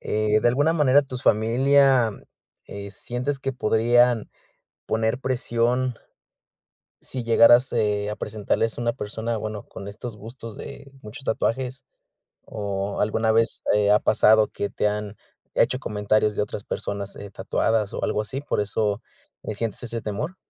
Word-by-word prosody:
eh, 105 0 +1
¿de - - +3
alguna 145 +6 +2
manera 145 -3 +4
tus 130 -2 -7
familia, 130 +2 +4 0.6
eh, 100 0 -8
sientes 125 +6 -3
que 135 0 -3
podrían 120 0 +3 0.6
poner 110 +2 0
presión 125 -1 0 1.0
si 130 - -4
llegaras, 120 +2 +6
eh, 105 -2 0
a 105 - -4
presentarles 110 +2 -1
a - - -3
una 120 0 +1
persona, 115 0 -4
bueno, 105 -1 -5
con 100 - -9
estos 110 +2 -8
gustos 115 +1 -10
de 140 -1 -10
muchos 120 +7 -10
tatuajes? 130 +3 -1 0.7
o, 100 -2 -3
¿alguna 110 +1 +1
vez, 115 0 +1
eh, 105 -1 +3
ha 105 - +6
pasado 110 0 +4
que 100 - -3
te - - -1
han 105 0 -4 0.4
hecho 125 +2 +2
comentarios 105 -1 0
de - - +1
otras 105 0 -5
personas, 100 -1 -5
eh, 100 - -9
tatuadas 105 +1 -1
o - - -2
algo - - 0
así? 130 +6 -5
¿Por 145 - -1
eso 105 0 -1 0.5
sientes 115 +2 -3
ese 115 -1 -3
temor? 115 - -4
110 Hz, 150 wpm, -24 LUFS, 105-125 Hz, 1.0 s, llegaras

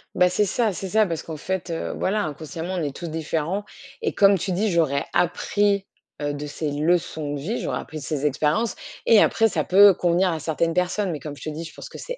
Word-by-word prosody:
Bah, 180 0 +5
c'est 180 +4 +2
ça 220 +1 0
c'est 190 +2 -5
ça 215 +2 +4
parce 165 -4 -4
qu'en 160 -2 -7
fait, 190 +2 -3
heu, 165 - -3
voilà, 210 +2 0
inconsciemment, 160 +4 -5
on 175 -3 -1
est 145 - -3
tous 170 - -6
différents, 160 +4 -2 0.4
et - - 0
comme 200 -1 +5
tu 185 - -3
dis, 200 +4 +1
j'aurais 155 -5 +1
appris, 200 +3 +1 0.4
heu, 145 0 -1
de 145 +1 -5
ces 150 +1 -3
leçons 155 -1 0
de - - -4
vie, 195 - -3
j'aurais - - -2
appris 155 - -7
de - - -9
ces 150 -1 -2
expériences, 150 - +1 0.3
et 220 -3 +7
après 225 0 +4
ça - - -1
peut 200 +1 +7
convenir 175 +1 +2
à 160 -2 -2
certaines 165 +2 0
personnes, 180 +2 0
mais 150 - -5
comme 145 -2 -7
je - - -11
te 155 - -3
dis, 155 +2 -5
je 160 - -9
pense - - -9
que - - -11
c'est - - -6
170 Hz, 240 wpm, -24 LUFS, 155-195 Hz, 0.4 s, et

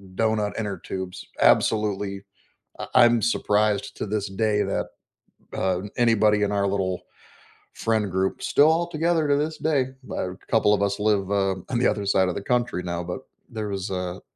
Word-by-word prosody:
doughnut 110 -1 0
inner 105 -3 -3
tubes, 90 +1 -6 0.2
absolutely 105 -2 +2 0.6
I - - -4
I'm 120 -2 +6
surprised 105 -2 +1
to - - -3
this 105 -1 -2
day 105 +1 +1
that, - - -2 0.7
uh, 95 -1 0 0.2
anybody 110 -3 +3
in 100 - 0
our 100 -1 +1
little 95 -2 -1 0.7
friend 110 -3 0
group 95 +1 -1
still 150 +2 +5
all 170 +1 +1
together 165 -1 +1
to 145 - +3
this 155 +2 -2
day, 145 -5 +1 0.3
a 90 0 -3
couple 110 -2 +4
of 105 - +1
us 100 +1 -1
live, 105 -2 +1
uh, 95 -1 +1
on 120 - 0
the 125 - +3
other 100 - -1
side 95 -1 +3
of 90 - -3
the - - -3
country 120 -6 0
now, 85 0 -3
but 90 +8 -5 0.3
there 110 -4 -4
was 100 0 -4
a 90 -1 -4
105 Hz, 175 wpm, -24 LUFS, 95-115 Hz, 0.7 s, I'm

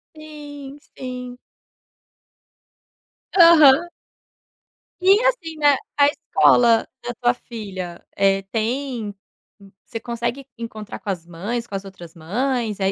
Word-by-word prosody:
Sim, 290 -2 -10 0.2
sim. 250 -1 -7 2.0
Aham. 335 -1 +7 1.1
E, 370 +1 +2 0.2
assim, 365 -11 0
né, 290 -2 +5 0.2
a 285 -1 +6
escola 235 -5 +3 0.2
da 245 0 -4
tua 245 -1 +3
filha, 195 -8 -8
eh, 195 0 +2
tem 230 -2 -2 0.7
você 225 - -6
consegue 235 +3 -4
encontrar 220 -2 -7
com - - -7
as 175 -4 -3
mães, 205 +8 -4
com 200 - -7
as 195 0 -5
outras 175 -4 -12
mães, 220 +5 -2
eh, 190 0 +1
240 Hz, 110 wpm, -21 LUFS, 200-280 Hz, 2.0 s, Aham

